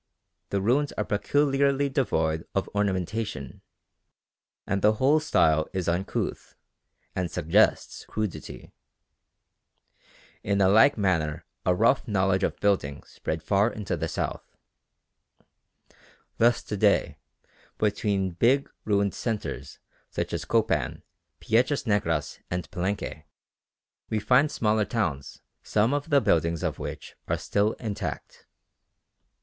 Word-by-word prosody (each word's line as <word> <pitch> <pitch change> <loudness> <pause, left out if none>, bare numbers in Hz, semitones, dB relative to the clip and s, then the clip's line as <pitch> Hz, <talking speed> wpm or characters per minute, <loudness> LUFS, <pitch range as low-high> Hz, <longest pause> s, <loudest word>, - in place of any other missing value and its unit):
The 100 - 0
ruins 140 +7 +2
are 105 - -2
peculiarly 140 +5 +2
devoid 80 - 0
of 95 - 0
ornamentation, 100 - -2 1.0
and 95 0 -1
the 105 +2 +5
whole 135 +7 +3
style 80 - +2
is 95 -2 -2
uncouth 90 +3 -2 0.6
and 90 -2 -1
suggests 80 0 +2
crudity. 110 -4 -5 1.7
In 100 0 0
a 95 - +5
like 110 +7 +6
manner 80 -7 0 0.2
a 90 - +4
rough 115 +7 +3
knowledge 95 -2 +1
of - - -1
building 95 -9 0
spread 80 0 -5
far 100 +6 +2
into 105 -4 -3
the 80 0 -2
south. - - -5 1.8
Thus 120 +1 +4
to 105 - -4
day, 100 0 +2 0.6
between 100 -2 0
big 125 +10 +2
ruined 100 -2 +1
centres 110 -3 -4 0.3
such - - -3
as - - -3
Copan, - - 0 0.4
Piedras 130 +5 +1
Negras, 80 - 0
and 90 0 -3
Palenque, 90 -4 -3 0.8
we 110 - 0
find 125 +8 +4
smaller 110 -1 +1
towns 85 - -3 0.2
some 110 +5 +1
of 145 +2 -2
the 140 -2 +4
buildings 85 -3 +1
of - - -2
which - - -7
are - - 0
still 105 +2 0
intact. 100 - -6
100 Hz, 115 wpm, -26 LUFS, 90-115 Hz, 1.8 s, like